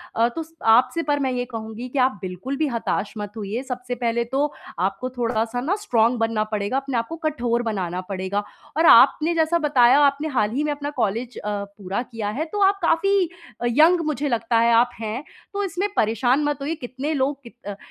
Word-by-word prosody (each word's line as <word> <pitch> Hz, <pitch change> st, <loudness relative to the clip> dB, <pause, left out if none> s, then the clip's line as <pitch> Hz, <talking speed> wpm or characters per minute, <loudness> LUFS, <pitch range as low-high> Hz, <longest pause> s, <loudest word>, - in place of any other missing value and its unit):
अ, 230 Hz, +1 st, +4 dB
तो 325 Hz, -, -3 dB
स 320 Hz, +1 st, -20 dB, 0.2 s
आपसे 330 Hz, +7 st, +1 dB
पर 290 Hz, -1 st, 0 dB
मैं 265 Hz, -2 st, 0 dB
ये 245 Hz, -1 st, -2 dB
कहूँगी 225 Hz, 0 st, -7 dB
कि 270 Hz, -, -2 dB
आप 255 Hz, -4 st, +2 dB
बिल्कुल 190 Hz, +9 st, -5 dB
भी 310 Hz, -, +1 dB
हताश 230 Hz, -4 st, -2 dB
मत 205 Hz, -1 st, -5 dB
होइए। 215 Hz, +4 st, -4 dB
सबसे 250 Hz, -1 st, -5 dB
पहले 235 Hz, -1 st, 0 dB
तो 275 Hz, +5 st, -1 dB, 0.3 s
आपको 195 Hz, +7 st, -1 dB
थोड़ा-सा 240 Hz, -1 st, -1 dB
ना 325 Hz, +10 st, 0 dB
स्ट्रॉंग 240 Hz, -, +1 dB
बनना 225 Hz, -1 st, +1 dB
पड़ेगा, 215 Hz, +3 st, -2 dB
अपने 270 Hz, -2 st, -2 dB
आपको 230 Hz, +8 st, -2 dB
कठोर 240 Hz, -5 st, 0 dB
बनाना 185 Hz, -5 st, -2 dB
पड़ेगा 195 Hz, +1 st, -2 dB, 0.3 s
और 325 Hz, -, +4 dB
आपने 305 Hz, +5 st, +6 dB
जैसा 325 Hz, +1 st, +2 dB
बताया, 275 Hz, -3 st, +5 dB
आपने 290 Hz, +1 st, +3 dB
हाल 220 Hz, -8 st, 0 dB
ही 275 Hz, +6 st, -1 dB
में 300 Hz, -, 0 dB
अपना 290 Hz, 0 st, -4 dB
कॉलेज 230 Hz, +4 st, -2 dB
अ, 210 Hz, -, -4 dB, 0.3 s
पूरा 195 Hz, +2 st, -3 dB
किया 220 Hz, -3 st, -3 dB
है, 275 Hz, +10 st, -2 dB
तो 405 Hz, +6 st, -4 dB
आप 395 Hz, 0 st, -2 dB
काफ़ी 375 Hz, +2 st, +2 dB, 0.3 s
अ, -, -, -1 dB
यंग 320 Hz, +8 st, +5 dB
मुझे 295 Hz, -1 st, -1 dB
लगता 230 Hz, -1 st, +1 dB
है 235 Hz, 0 st, +4 dB
आप 235 Hz, +2 st, +5 dB
हैं। 225 Hz, +4 st, -4 dB, 0.3 s
तो 405 Hz, 0 st, -1 dB
इसमें 385 Hz, +2 st, -2 dB
परेशान 245 Hz, +6 st, +2 dB
मत 295 Hz, 0 st, 0 dB
होइए, 300 Hz, +4 st, -2 dB
कितने 265 Hz, +1 st, -4 dB
लोग 275 Hz, 0 st, 0 dB
कित 235 Hz, 0 st, -13 dB
अ, 205 Hz, -, -4 dB
250 Hz, 210 wpm, -23 LUFS, 225-295 Hz, 0.3 s, आपने